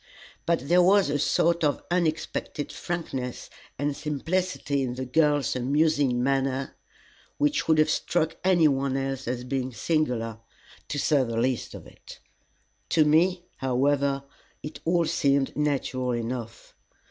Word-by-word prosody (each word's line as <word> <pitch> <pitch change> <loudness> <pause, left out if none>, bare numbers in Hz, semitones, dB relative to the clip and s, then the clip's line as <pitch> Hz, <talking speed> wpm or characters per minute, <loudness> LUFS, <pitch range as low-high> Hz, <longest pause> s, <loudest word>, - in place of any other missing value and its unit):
But 165 -5 0
there 175 +3 +5
was 190 -3 +4
a 145 - 0
sort 170 +3 +2
of 145 -1 +1
unexpected 160 -3 -2
frankness 135 -8 -5 0.3
and 145 +1 -1
simplicity 155 0 -2
in 125 -2 -2
the 130 +1 -4
girl's 145 0 +2
amusing 140 -1 +1
manner 135 0 0 0.6
which 295 0 +1
would 160 -1 +4
have 155 - +4
struck 160 -2 0
any 180 -4 +5
one 135 -1 0
else 135 -1 -3
as 125 0 -2
being 130 0 -2
singular, 120 -6 -1 0.5
to 145 - -4
say 145 -1 +2
the 115 -2 -4
least 125 +1 -1
of - - -10
it. - - -14 0.7
To 155 -2 +4
me, 175 +4 +3
however, 135 +2 +1 0.4
it 150 - -7
all 170 0 +2
seemed 140 -2 +1
natural 135 -4 -1
enough. 115 -1 -5
140 Hz, 135 wpm, -26 LUFS, 130-160 Hz, 0.7 s, there